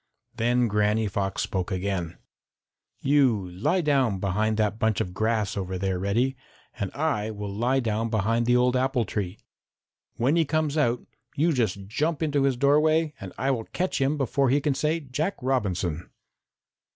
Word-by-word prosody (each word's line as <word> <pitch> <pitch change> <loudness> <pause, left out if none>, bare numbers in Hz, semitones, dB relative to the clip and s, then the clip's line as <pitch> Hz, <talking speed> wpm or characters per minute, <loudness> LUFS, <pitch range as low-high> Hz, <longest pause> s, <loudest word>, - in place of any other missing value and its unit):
Then 120 +1 +2
Granny 105 +1 +1
Fox 100 -1 -2
spoke 95 0 -3
again: 95 -3 -2 0.8
"You 125 -10 +2
lie 150 - +1
down 135 - +2
behind 105 +3 0
that 110 0 0
bunch 110 -2 +1
of 90 - -2
grass 110 -1 0
over 95 -2 -3
there, 95 -1 -1
Reddy, 115 +8 +1 0.4
and 100 - -1
I 140 -9 0
will 105 -2 -5
lie 125 +6 +1
down 115 -1 -1
behind 115 +2 +1
the 125 - +4
old 125 +1 +3
apple 130 -2 +1
tree. 100 -1 -3 0.8
When 130 +7 +2
he 165 - +4
comes 155 -1 0
out, 125 -6 +1 0.3
you 160 +3 +2
just 105 -6 -1
jump 150 +9 -1
into 145 -3 +1
his 135 -3 +1
doorway 150 +3 +3
and 95 -1 -7
I 135 - +1
will 115 -4 -2
catch 185 -5 -2
him 140 +3 +1
before 135 0 +1
he 140 +3 +3
can 145 0 0
say 155 +4 0
Jack 150 +7 -2
Robinson." 95 - -1
120 Hz, 165 wpm, -26 LUFS, 100-140 Hz, 0.8 s, the